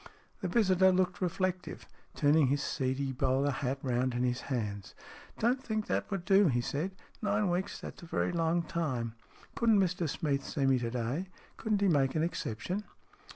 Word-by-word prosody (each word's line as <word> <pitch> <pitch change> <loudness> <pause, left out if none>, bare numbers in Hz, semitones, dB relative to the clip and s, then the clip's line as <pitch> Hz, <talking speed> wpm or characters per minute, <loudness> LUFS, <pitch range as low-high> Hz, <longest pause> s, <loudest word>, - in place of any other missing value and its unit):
The 190 - -1
visitor 190 -2 +4
looked 185 +1 +1
reflective, 185 0 -2 0.3
turning 145 0 +4
his 140 +2 +1
seedy 135 +1 -1
bowler 130 +2 +1
hat 135 0 -2
round 125 -1 0
in 120 - 0
his 125 0 0
hands. 105 -6 -3 0.4
"Don't 245 +4 +2
think 215 -3 -2
that - - -1
would 195 -3 -3
do," 195 +1 +5
he 120 -5 +2
said. 150 +10 -2 0.3
"Nine 205 -2 +1
weeks 190 +3 -2
that's - - -9
a 170 - -10
very 165 - 0
long 170 0 +1
time. 130 -9 -2 0.4
Couldn't 225 -3 +4
Mr 175 -3 +1
Smeath 140 -2 -1
see 140 +1 -1
me 135 -1 +4
to 120 -1 -2
day? 125 +9 -2 0.3
Couldn't 215 -2 0
he 200 - +4
make 140 -6 +2
an 155 - +2
exception 175 - -3
160 Hz, 175 wpm, -31 LUFS, 130-190 Hz, 0.4 s, do